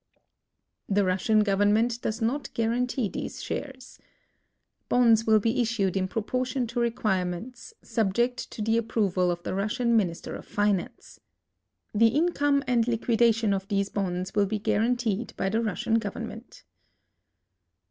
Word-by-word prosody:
The 200 0 +2
Russian 190 +4 +2
government 210 +4 +2
<loes 225 +1 -2
not 270 +6 -1
guar 230 0 +1
antee 250 -1 0
these - - -6
shares. 265 -2 -6 0.9
Bonds 230 -2 +4
will 220 -1 +6
be 230 +4 +1
issued 220 -6 0
in 190 -1 0
proportion 255 +5 -2
to 240 - -1
require 225 -6 0
ments, 235 - -7
subject 235 +3 0
to 215 - -5
the 225 +2 +2
api)roval 200 -5 0
of 175 0 -5
the - - -3
Russian 230 +5 0
Minister 180 -7 -1
of - - -9
Finance. 205 -3 -2 0.7
The 225 +2 +5
income 290 +1 +2
and 240 -2 +2
liquidation 230 -2 +2
of 195 0 -3
these 200 0 0
bonds 185 -1 -3
will 205 -1 +2
l)e 215 - +1
guaranteed 225 0 0
by 195 - 0
the 220 +3 0
Russian 225 +1 0
government. 205 -3 -7
225 Hz, 140 wpm, -27 LUFS, 200-240 Hz, 0.9 s, will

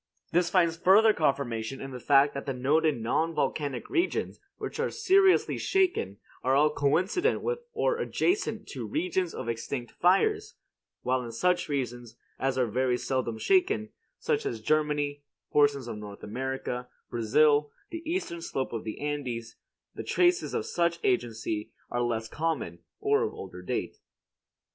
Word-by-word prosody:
This 175 0 +2
finds 170 -3 +3
further 210 +5 +6
confirmation 135 - -1
in 135 - -7
the 125 - -6
fact 140 +2 +4
that 140 - -6
the 135 - -1
noted 150 +2 +2
non 160 +9 0
volcanic 140 -2 -1
regions 345 +2 -1 0.2
which - - -6
are - - +1
seriously 390 -3 +3
shaken 360 - +1 0.3
are 130 +1 +3
all 150 +2 +4
coincident 185 - +1
with 475 0 -1
or - - 0
adjacent 355 - 0
to 125 -5 -5
regions 175 - -1
of - - -5
extinct 120 +2 -4
fires; 415 - +2 0.5
while 130 0 +1
in 120 - -6
such 175 +9 +1
regions 120 -4 -3 0.2
as 135 0 0
are 130 - +3
very 125 +2 +1
seldom 125 -3 -2
shaken, 375 - +2 0.3
such 445 -1 0
as 415 - -3
Germany, 150 -2 0 0.3
portions 145 -3 +3
of 110 -3 -5
North 100 -1 -9
America, 125 +1 -4 0.2
Brazil, 145 +6 +3 0.2
the 335 -1 -5
eastern 325 - -3
slope 135 -7 -3
of 115 - -3
the 110 - -6
Andes, 130 -6 -4 0.4
the - - -6
traces 360 0 +2
of - - -1
such 170 -1 +1
agency 115 -4 -1 0.2
are 120 - 0
less 115 -2 -1
common, 160 +7 -2 0.2
or 425 +1 +2
of 450 - -2
older - - -8
date. - - -3
145 Hz, 155 wpm, -28 LUFS, 125-185 Hz, 0.5 s, further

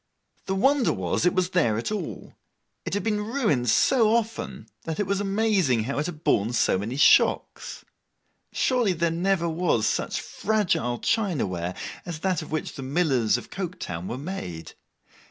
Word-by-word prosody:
The 190 - 0
wonder 265 +5 +3
was, 95 - 0
it 180 - +1
was 185 0 +1
there 120 -13 +2
at 115 - -3
all. 215 - -5 0.5
It - - -2
had 205 - -1
been 210 -2 0
ruined 210 - 0
so 225 - +4
often, 225 -1 -3
that 160 +2 -5
it 205 - +1
was 200 +1 -1
amazing 195 - +1
how 140 +5 -2
it 150 - -1
had 160 -2 -8
borne 110 +4 +2
so 115 -5 +2
many 110 +6 -4
shocks. 145 - +3 0.7
Surely 245 -7 +1
there 170 0 0
never 175 +1 +1
was 165 -9 +1
such - - -1
fragile 185 - -1
china 195 - 0
ware 90 -1 -4 0.3
as 165 -3 -6
that 185 -4 0
of 155 - -10
which 155 -1 -3
the - - -8
millers 135 -5 +1
of - - -10
Coketown 170 - -5
were 120 - -4
made. 90 - -6
170 Hz, 170 wpm, -25 LUFS, 125-205 Hz, 0.7 s, so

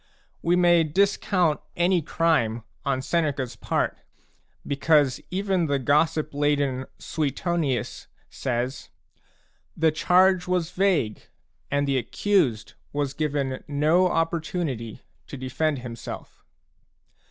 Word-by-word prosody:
We 175 +1 +2
may 175 -2 +5
discount 180 -1 +1
any 175 0 +2
crime 145 -9 +1 0.2
on 130 -1 -1
Seneca's 145 -6 -1
part - - -1 0.7
because 145 -2 +2
even 190 -2 0
the 140 -1 +1
gossip 150 +3 +1
laden 145 -3 0
Suetonius 155 - -2 0.2
says: 125 0 -3 0.4
" - - -39
The 160 0 +3
charge 180 +3 +3
was 180 -2 0
vague 180 - 0 0.4
and 145 0 0
the 135 -1 +2
accused 140 - 0 0.2
was 145 -2 -2
given 140 -3 -2
no 155 +6 +3
opportunity 165 - -2 0.2
to 140 - -7
defend 135 +4 -1
himself." 115 -2 -8
150 Hz, 105 wpm, -25 LUFS, 135-175 Hz, 0.7 s, may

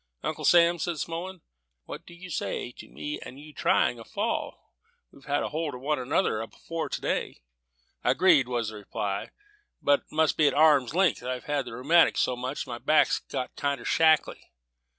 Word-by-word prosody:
"Uncle - - -3
Sam," 170 0 +5
said 170 0 -2
Smullen, 170 +3 -5 0.4
"what - - -9
do 175 - -12
you 180 +1 -10
say 125 - -3
to - - -13
me 150 - -6
and 130 - -10
you 150 +1 -13
trying 160 -5 +2
a - - -9
fall; - - -4 0.4
we've 140 - -18
had 145 0 0
hold 155 -2 -3
of 125 - -10
one 150 +1 0
another 125 - 0
afore 165 +8 -6
to - - -3
day?" - - -3 0.6
"Agreed," 140 +1 +4
was 120 -3 -2
the 110 - -9
reply; 100 -1 -4 0.5
"but 145 0 +3
it - - -33
must 155 0 +2
be 155 - +4
at - - +1
arm's 145 -3 +4
length. 185 -4 +2
I've 125 0 -4
had 145 -2 -1
the 120 - -8
rheumatics 160 +8 +3
so 125 - +1
much 130 +3 -4
that 130 - -9
my 120 - -4
back's 155 +3 +3
got 125 - -5
kinder 140 -1 -2
shackly." 160 -1 +3
145 Hz, 190 wpm, -27 LUFS, 125-165 Hz, 0.6 s, Sam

